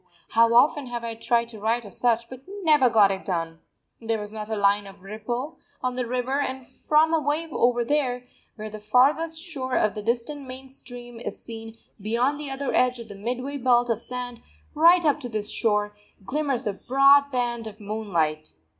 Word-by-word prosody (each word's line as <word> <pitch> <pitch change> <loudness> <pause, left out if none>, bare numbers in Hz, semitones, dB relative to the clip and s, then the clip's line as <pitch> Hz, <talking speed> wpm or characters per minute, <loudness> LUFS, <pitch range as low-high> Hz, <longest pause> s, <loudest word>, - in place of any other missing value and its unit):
How 230 0 +4
often 285 +2 +4
have 240 -1 -5
I 230 -1 -3
tried 235 +1 0
to 220 -2 -10
write 225 +2 0
of 205 - -11
such, 235 -1 +1
but 255 +1 -10 0.2
never 300 -6 +5
got 210 -4 +5
it 190 0 -4
done! 165 -3 -3 0.4
There 225 0 -1
was 210 0 -4
not 215 0 -6
a 220 - -1
line 200 0 +2
of 195 -1 -14
ripple 240 +9 -5 0.2
on 250 0 0
the 250 -1 -2
river; 255 +3 -1
and 265 -2 -3
from 310 +5 +2
away 310 +1 0
over 240 -2 +2
there, 250 -3 0 0.3
where 215 -1 -7
the 215 - -7
farthest 280 +9 +2
shore 275 -7 -4
of 215 - +2
the 210 - -5
distant 245 +6 -2
main 260 +1 -9
stream 245 -2 -9
is - - -6
seen 225 -1 -8 0.2
beyond 240 +7 0
the 295 -2 -5
other 270 0 -3
edge 250 0 +3
of 230 -2 -10
the 205 - -8
midway 250 +7 -4
belt 245 -2 +3
of 225 - -1
sand, 245 0 -6 0.3
right 340 +2 +5
up 295 0 +3
to 250 -4 -6
this 215 -2 -3
shore, 210 -2 +1 0.3
glimmers 275 0 -1
a 210 - -1
broad 275 +6 +4
band 240 -3 -2
of 215 0 -10
moonlight. 175 - -2
240 Hz, 195 wpm, -25 LUFS, 215-270 Hz, 0.4 s, never